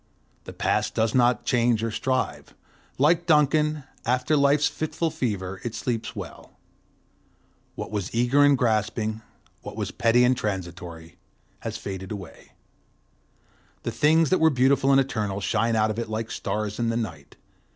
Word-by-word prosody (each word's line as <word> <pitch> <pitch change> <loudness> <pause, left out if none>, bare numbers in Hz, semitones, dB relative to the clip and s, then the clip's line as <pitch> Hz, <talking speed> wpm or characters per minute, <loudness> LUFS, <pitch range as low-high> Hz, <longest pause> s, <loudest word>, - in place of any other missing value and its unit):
The - - -7
Past - - 0
does 110 0 +1
not 120 -2 +3
change 120 -3 +2
or 115 - -1
strive; 110 - -2 0.4
like 165 +5 +3
Duncan, 150 -1 +3 0.2
after 125 +5 +1
life's 140 +1 +3
fitful 160 +1 -2
fever 100 - -3
it 120 -2 -4
sleeps 115 -3 -3
well; - - -9 1.2
what - - -6
was 105 -4 -2
eager 125 +5 +3
and 145 -1 +5
grasping, 110 -2 0 0.4
what - - -8
was - - -3
petty 115 +1 +3
and 125 +1 +4
transitory, 90 -5 -5 0.4
has - - -5
faded 95 -1 -6
away, 95 -5 -9 1.3
the - - -2
things 160 +3 +3
that 185 - +4
were 160 - +5
beautiful 135 0 +3
and 135 - +6
eternal 105 -7 -1
shine 115 +3 0
out 110 0 +2
of 110 - -4
it 115 - -4
like 110 +1 -3
stars 105 0 -3
in 115 -1 +1
the 115 - 0
night. 80 -11 -6
115 Hz, 150 wpm, -25 LUFS, 105-140 Hz, 1.3 s, and